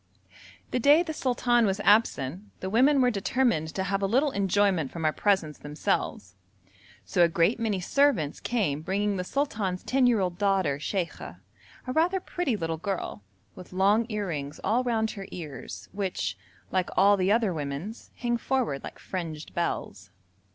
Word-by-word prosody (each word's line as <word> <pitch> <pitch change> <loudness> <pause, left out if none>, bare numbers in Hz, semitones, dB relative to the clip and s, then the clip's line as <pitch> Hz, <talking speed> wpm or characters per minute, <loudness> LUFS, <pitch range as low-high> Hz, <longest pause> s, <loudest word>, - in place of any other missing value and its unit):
The - - 0
day 290 +7 +6
the 320 -2 -5
sultan 240 -4 +2
was 195 +1 -1
absent, 205 - +1
the 190 - -4
women 265 +5 +4
were 250 -1 +4
determined 210 -4 +1
to 190 - 0
have 195 +1 -1
a 195 - +1
little 270 +8 +2
enjoyment 195 - +1
from 165 -2 -4
our 155 - +3
presence 190 -7 +1
themselves, 145 - -2 0.7
so 180 - +1
a - - +6
great 170 +8 +2
many 215 -4 0
servants 185 - +2
came 185 -12 -1
bringing 200 +4 -1
the 180 - -2
sultan's 205 -7 -2
ten 260 -1 +3
year 235 -3 +3
old 180 -2 -2
daughter 190 -8 +1
Sheikha, 175 +3 -4 0.5
a 255 - -3
rather 345 +5 +2
pretty 345 - -2
little 165 -3 -2
girl, 190 - -4 0.3
with 180 - -12
long 205 +5 +3
earrings 165 -10 -4
all 230 +6 +2
round 220 -3 0
her 195 -2 -8
ears, 135 - -8
which, 185 - -2 0.4
like 185 -1 0
all 200 +2 +6
the 190 0 +1
other 220 -4 +2
women's, 150 +8 -5
hang 240 -1 -1
forward 235 - -1
like - - -8
fringed 160 -4 -6
bells. 100 - -3
195 Hz, 165 wpm, -27 LUFS, 165-235 Hz, 0.7 s, day